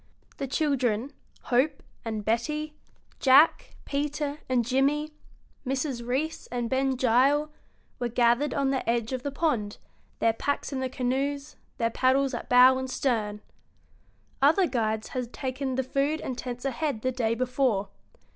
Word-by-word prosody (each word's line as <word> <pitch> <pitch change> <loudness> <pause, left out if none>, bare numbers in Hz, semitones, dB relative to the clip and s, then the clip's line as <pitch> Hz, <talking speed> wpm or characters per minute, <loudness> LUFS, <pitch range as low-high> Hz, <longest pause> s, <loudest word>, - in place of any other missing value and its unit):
The 275 - -3
children, 265 -3 0 0.3
Hope 275 +4 +1 0.2
and 220 -2 -4
Betty, 300 +7 -1 0.5
Jack, 275 +4 +5
Peter, 290 +1 -2
and 245 -2 +2
Jimmy, 285 +5 +1 0.5
Mrs. 260 -2 -2
Reece 270 +7 -2
and 240 -2 -3
Ben 265 0 +1
Gile, 265 +5 +3 0.5
were 245 - 0
gathered 240 +4 +2
on 275 -1 +1
the 265 -3 -1
edge 235 +1 0
of 255 - -2
the 285 - -3
pond, 265 -9 -1 0.4
their 225 - +2
packs 285 +4 -2
in 265 - -2
the 260 0 -2
canoes, 275 +3 -2 0.2
their 230 0 0
paddles 265 +2 +2
at 240 - -5
bow 255 +1 +7
and 260 0 -4
stern. 215 -6 -1 1.0
Other 320 +7 +5
guides 220 -6 -1
had 250 -2 -4
taken 260 0 -3
the 265 - 0
food 280 +4 0
and 255 - -4
tents 245 +1 -6
ahead 270 -3 -2
the 255 - +1
day 230 -3 0
before. 250 -5 0
260 Hz, 145 wpm, -27 LUFS, 240-280 Hz, 1.0 s, bow